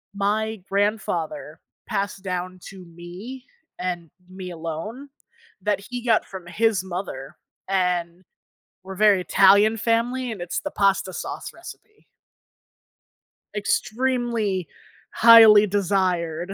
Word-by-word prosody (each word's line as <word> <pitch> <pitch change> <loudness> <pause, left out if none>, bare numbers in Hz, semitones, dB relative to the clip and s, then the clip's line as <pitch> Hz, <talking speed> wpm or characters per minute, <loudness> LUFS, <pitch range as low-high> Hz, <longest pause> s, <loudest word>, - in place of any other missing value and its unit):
my 215 +1 -1
grandfather 195 -5 -2 0.3
passed 200 -2 -3
down 185 0 -4
to 190 -2 -12
me, 180 +10 -10 0.3
and 175 -3 -4 0.2
me 185 -1 -8
alone, 170 - -6 0.5
that 205 0 0
he 245 -1 -5
got 225 -2 +3
from 185 -2 -10
his 205 +2 +1
mother, 175 -8 -6 0.3
and 180 -2 -1 0.6
we're 190 0 -8
very 205 -2 +4
Italian 200 +4 +5
family 235 +3 0
and 205 - -7
it's 175 - -3
the 295 - -5
pasta 195 -1 +1
sauce - - -6
recipe. 425 0 -14 1.5
Extremely 225 -4 -1 0.4
highly 220 -2 +8
desired 185 -3 -1
195 Hz, 105 wpm, -23 LUFS, 180-220 Hz, 1.5 s, highly